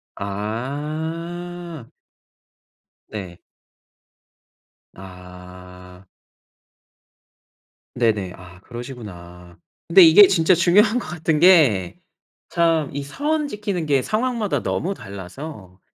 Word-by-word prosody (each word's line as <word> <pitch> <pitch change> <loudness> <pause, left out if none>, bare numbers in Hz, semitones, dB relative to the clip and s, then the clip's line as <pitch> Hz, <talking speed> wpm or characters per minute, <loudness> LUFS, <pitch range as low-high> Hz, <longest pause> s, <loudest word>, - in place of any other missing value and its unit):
아. 155 - -5 1.2
네. 95 -5 -8 1.6
아. 90 0 -13 1.9
네네 105 -7 0
아 90 0 -14
그러시구나. 90 -9 -10 0.3
근데 185 +3 +7
이게 170 +5 +9
진짜 175 0 +3
중요한 205 +7 +4
것 - - -8
같은 160 -3 -1
게 145 - +4 0.5
참 165 -4 +1
이 145 - -3
선 295 - -2
지키는 205 - -4
게 140 -3 +2
상황마다 225 - -1
너무 190 +4 -2
달라서 100 - -10
140 Hz, 150 characters per minute, -21 LUFS, -, 1.9 s, 이게